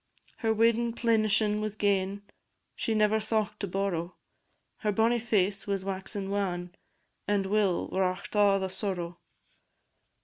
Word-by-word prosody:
Her 225 Hz, -2 st, 0 dB
weddin' 230 Hz, +1 st, +2 dB
plenishin' 215 Hz, -2 st, +2 dB
was 215 Hz, -1 st, -3 dB
gane, 200 Hz, -1 st, 0 dB, 0.5 s
She 225 Hz, -, -1 dB
never 215 Hz, 0 st, +3 dB
thocht 215 Hz, -1 st, -1 dB
to 200 Hz, -, -2 dB
borrow: 185 Hz, -2 st, -2 dB, 0.6 s
Her 210 Hz, -, 0 dB
bonnie 225 Hz, +3 st, +2 dB
face 205 Hz, -4 st, 0 dB
was 195 Hz, -1 st, -1 dB
waxin' 195 Hz, 0 st, -3 dB
wan 180 Hz, -3 st, -2 dB, 0.5 s
And 205 Hz, -1 st, +1 dB
Will 200 Hz, -2 st, +1 dB
wrought 185 Hz, -1 st, -1 dB
a' 205 Hz, -1 st, +5 dB
the 190 Hz, -, -1 dB
sorrow. 180 Hz, -3 st, -3 dB
205 Hz, 130 wpm, -29 LUFS, 190-215 Hz, 0.6 s, a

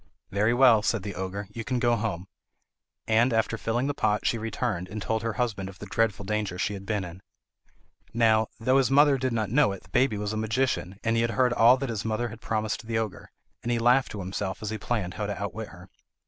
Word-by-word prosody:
"Very 105 Hz, +3 st, +2 dB
well," 120 Hz, -3 st, +6 dB
said 105 Hz, -1 st, 0 dB
the 100 Hz, -, -5 dB
ogre, 95 Hz, +2 st, -5 dB
"you 115 Hz, -, -5 dB
can 125 Hz, +3 st, -1 dB
go 120 Hz, -1 st, +3 dB
home." 105 Hz, -5 st, -3 dB, 0.8 s
And 115 Hz, +3 st, +3 dB
after 115 Hz, 0 st, +1 dB
filling 115 Hz, +3 st, -1 dB
the 145 Hz, -, 0 dB
pot 105 Hz, -5 st, 0 dB
she 115 Hz, -, +1 dB
returned, 110 Hz, -4 st, -2 dB
and 110 Hz, -, -5 dB
told 110 Hz, +2 st, -1 dB
her 115 Hz, -1 st, -2 dB
husband 105 Hz, -6 st, -2 dB
of 95 Hz, -, -12 dB
the 100 Hz, -, -8 dB
dreadful 105 Hz, 0 st, 0 dB
danger 105 Hz, -3 st, -2 dB
she 100 Hz, +3 st, -1 dB
had 100 Hz, 0 st, -8 dB
been 105 Hz, -2 st, -1 dB
in. 90 Hz, +1 st, -9 dB, 0.9 s
Now, 110 Hz, -1 st, +3 dB
though 130 Hz, +4 st, +3 dB
his 130 Hz, -4 st, +2 dB
mother 140 Hz, 0 st, +5 dB
did 130 Hz, 0 st, 0 dB
not 110 Hz, -3 st, -1 dB
know 135 Hz, -5 st, +4 dB
it, 100 Hz, -, -10 dB
the 95 Hz, -, -20 dB
baby 125 Hz, 0 st, +2 dB
was 105 Hz, +1 st, -3 dB
a -, -, -2 dB
magician 110 Hz, -4 st, -1 dB
and 115 Hz, 0 st, +1 dB
he -, -, +3 dB
had 115 Hz, -, +1 dB
heard 125 Hz, +3 st, +2 dB
all 120 Hz, +2 st, +6 dB
that 135 Hz, -1 st, -3 dB
his 110 Hz, -3 st, -3 dB
mother 115 Hz, +2 st, -1 dB
had 115 Hz, +1 st, -11 dB
promised 110 Hz, 0 st, -2 dB
the 115 Hz, -1 st, -1 dB
ogre; 110 Hz, -4 st, -4 dB, 0.3 s
and 120 Hz, -, -2 dB
he 120 Hz, -, +2 dB
laughed 125 Hz, +3 st, +3 dB
to 105 Hz, -, -5 dB
himself 95 Hz, +2 st, -4 dB
as 105 Hz, -, -3 dB
he 110 Hz, -, -4 dB
planned 100 Hz, -5 st, -2 dB
how -, -, -3 dB
to -, -, -4 dB
outwit -, -, -4 dB
her. -, -, -13 dB
110 Hz, 240 wpm, -27 LUFS, 100-120 Hz, 0.9 s, well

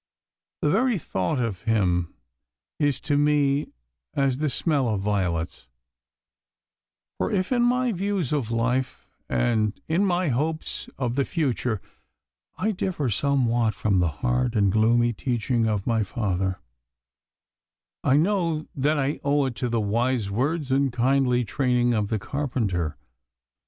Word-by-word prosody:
The -, -, +3 dB
very 255 Hz, -4 st, +2 dB
thought 125 Hz, -, -2 dB
of 115 Hz, -7 st, -2 dB
him 90 Hz, -7 st, +1 dB, 0.6 s
is 145 Hz, -4 st, +1 dB
to 145 Hz, -1 st, +1 dB
me 145 Hz, -1 st, +2 dB, 0.5 s
as 135 Hz, -2 st, +1 dB
the 150 Hz, +1 st, 0 dB
smell 140 Hz, -3 st, +1 dB
of 105 Hz, -3 st, -1 dB
violets; 85 Hz, -9 st, -2 dB, 1.5 s
for -, -, 0 dB
if 185 Hz, 0 st, 0 dB
in 245 Hz, -1 st, +3 dB
my 250 Hz, +1 st, +2 dB
views 195 Hz, -, -1 dB
of 135 Hz, -7 st, -1 dB
life 125 Hz, +3 st, -1 dB, 0.2 s
and 110 Hz, -3 st, +1 dB
in 170 Hz, +5 st, +2 dB
my 180 Hz, -3 st, +1 dB
hopes 155 Hz, +6 st, -2 dB
of 125 Hz, -3 st, -1 dB
the 140 Hz, +2 st, +1 dB
future 125 Hz, -, -1 dB, 0.7 s
I 215 Hz, +4 st, 0 dB
differ 175 Hz, -, -2 dB
somewhat 120 Hz, -3 st, +1 dB
from 100 Hz, -4 st, +1 dB
the 90 Hz, -2 st, +2 dB, 0.2 s
hard 125 Hz, -1 st, +1 dB
and 100 Hz, -3 st, +3 dB
gloomy 120 Hz, +3 st, +3 dB
teaching 120 Hz, +1 st, 0 dB
of 105 Hz, -3 st, -1 dB
my 115 Hz, -2 st, +1 dB
father, 95 Hz, -3 st, -2 dB, 1.4 s
I 135 Hz, -, +4 dB
know 165 Hz, -3 st, +1 dB
that 150 Hz, +2 st, +1 dB
I 140 Hz, +1 st, -1 dB
owe 145 Hz, 0 st, +2 dB
it 130 Hz, -3 st, -3 dB
to 125 Hz, -, -1 dB
the 115 Hz, -1 st, 0 dB
wise 115 Hz, 0 st, 0 dB
words 140 Hz, +6 st, -1 dB
and 135 Hz, 0 st, +2 dB
kindly 125 Hz, 0 st, +2 dB
training 125 Hz, 0 st, +1 dB
of 105 Hz, -2 st, 0 dB
the 110 Hz, -, -1 dB
carpenter. 105 Hz, -, -2 dB
125 Hz, 140 wpm, -25 LUFS, 110-145 Hz, 1.5 s, I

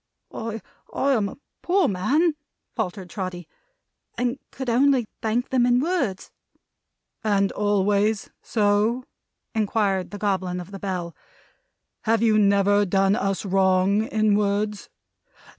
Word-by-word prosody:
"I 225 Hz, 0 st, -4 dB, 0.3 s
am 250 Hz, -7 st, +1 dB
a -, -, -11 dB, 0.2 s
poor 365 Hz, -2 st, +2 dB
man," 275 Hz, -, +2 dB, 0.4 s
faltered 190 Hz, -4 st, -3 dB
Trotty, 185 Hz, -4 st, -5 dB, 0.7 s
"and 245 Hz, +2 st, -1 dB
could 265 Hz, -, -7 dB
only 255 Hz, +1 st, +3 dB, 0.2 s
thank 230 Hz, +3 st, -1 dB
them 255 Hz, -2 st, +2 dB
in 245 Hz, 0 st, +4 dB
words." 275 Hz, -, -1 dB, 0.9 s
"And 200 Hz, -2 st, +2 dB
always 205 Hz, +1 st, +1 dB
so?" 215 Hz, +3 st, +1 dB, 0.5 s
inquired 205 Hz, -3 st, 0 dB
the 205 Hz, -, -7 dB
Goblin 190 Hz, -3 st, -1 dB
of 180 Hz, +2 st, -9 dB
the 195 Hz, -, -7 dB
Bell. 180 Hz, -4 st, -4 dB, 0.9 s
"Have 225 Hz, 0 st, +2 dB
you 215 Hz, -2 st, +4 dB
never 200 Hz, 0 st, +4 dB
done 195 Hz, +1 st, +2 dB
us 195 Hz, -3 st, -1 dB
wrong 190 Hz, +1 st, +3 dB
in 215 Hz, -1 st, +2 dB
words?" 205 Hz, 0 st, -1 dB
205 Hz, 120 wpm, -24 LUFS, 195-230 Hz, 0.9 s, in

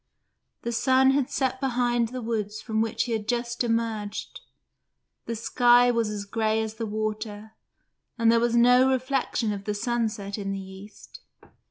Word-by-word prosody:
The 235 Hz, -, -2 dB
sun 260 Hz, +3 st, +4 dB
had 270 Hz, -2 st, +1 dB
set 260 Hz, -1 st, -1 dB
behind 240 Hz, -2 st, +1 dB
the 250 Hz, +1 st, -6 dB
woods 215 Hz, -2 st, -3 dB
from 220 Hz, 0 st, -1 dB
which 225 Hz, -1 st, 0 dB
he 240 Hz, -, -5 dB
had 215 Hz, -2 st, -2 dB
just 240 Hz, 0 st, -1 dB
emerged; 225 Hz, -3 st, -2 dB, 0.9 s
the 230 Hz, -, -2 dB
sky 245 Hz, +2 st, +4 dB
was 230 Hz, -2 st, 0 dB
as 205 Hz, -1 st, -5 dB
grey 220 Hz, +1 st, 0 dB
as 220 Hz, -1 st, -3 dB
the 225 Hz, 0 st, -5 dB
water, 215 Hz, 0 st, -4 dB, 0.7 s
and 230 Hz, -1 st, +4 dB
there 230 Hz, -, +4 dB
was 235 Hz, 0 st, +1 dB
no 250 Hz, +2 st, +5 dB
reflection 260 Hz, -4 st, 0 dB
of 200 Hz, -1 st, -7 dB
the 210 Hz, -, -2 dB
sunset 215 Hz, -3 st, -2 dB
in 195 Hz, -1 st, -3 dB
the 195 Hz, -, -4 dB
east. 195 Hz, -, -12 dB
230 Hz, 165 wpm, -26 LUFS, 215-245 Hz, 0.9 s, no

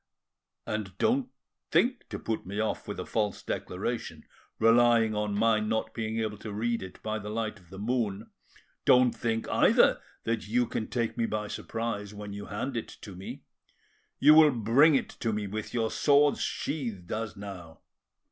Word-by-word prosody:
And 100 Hz, -4 st, -4 dB
don't 255 Hz, +2 st, +1 dB, 0.4 s
think 250 Hz, 0 st, +1 dB
to -, -, -4 dB
put 110 Hz, -1 st, -3 dB
me 100 Hz, +3 st, -5 dB
off 110 Hz, -, -2 dB
with -, -, -5 dB
a -, -, -4 dB
false 105 Hz, -3 st, -1 dB
declaration, -, -, -4 dB, 0.3 s
relying 115 Hz, 0 st, +5 dB
on 105 Hz, -1 st, -1 dB
my 110 Hz, 0 st, +3 dB
not 110 Hz, +1 st, -1 dB
being 110 Hz, 0 st, -3 dB
able 110 Hz, -2 st, -2 dB
to 110 Hz, -, -7 dB
read 115 Hz, +3 st, -1 dB
it 95 Hz, -1 st, -9 dB
by 110 Hz, 0 st, -2 dB
the 105 Hz, 0 st, -7 dB
light 110 Hz, -1 st, -3 dB
of 90 Hz, -2 st, -22 dB
the 95 Hz, -, -10 dB
moon; 110 Hz, -1 st, -2 dB, 0.5 s
don't 125 Hz, -1 st, +6 dB
think 115 Hz, -1 st, -2 dB
either -, -, +4 dB, 0.2 s
that 115 Hz, -3 st, -2 dB
you 120 Hz, +3 st, +2 dB
can 110 Hz, -, -3 dB
take 120 Hz, -1 st, -2 dB
me 115 Hz, -, +2 dB
by 105 Hz, -1 st, -2 dB
surprise 105 Hz, -1 st, -4 dB
when 105 Hz, -1 st, -7 dB
you 100 Hz, 0 st, -7 dB
hand 120 Hz, +7 st, -4 dB
it 115 Hz, -, -5 dB
me: 95 Hz, 0 st, -8 dB, 0.7 s
you 150 Hz, +2 st, +7 dB
will 155 Hz, -1 st, +8 dB
bring 130 Hz, +5 st, +4 dB
it -, -, 0 dB
to 115 Hz, -, 0 dB
me 105 Hz, -1 st, -2 dB
with 105 Hz, +2 st, -5 dB
your 115 Hz, -2 st, 0 dB
swords 145 Hz, 0 st, +4 dB
sheathed 115 Hz, -, -3 dB
as 110 Hz, -1 st, -3 dB
now. 95 Hz, -5 st, -9 dB
110 Hz, 175 wpm, -29 LUFS, 105-120 Hz, 0.7 s, will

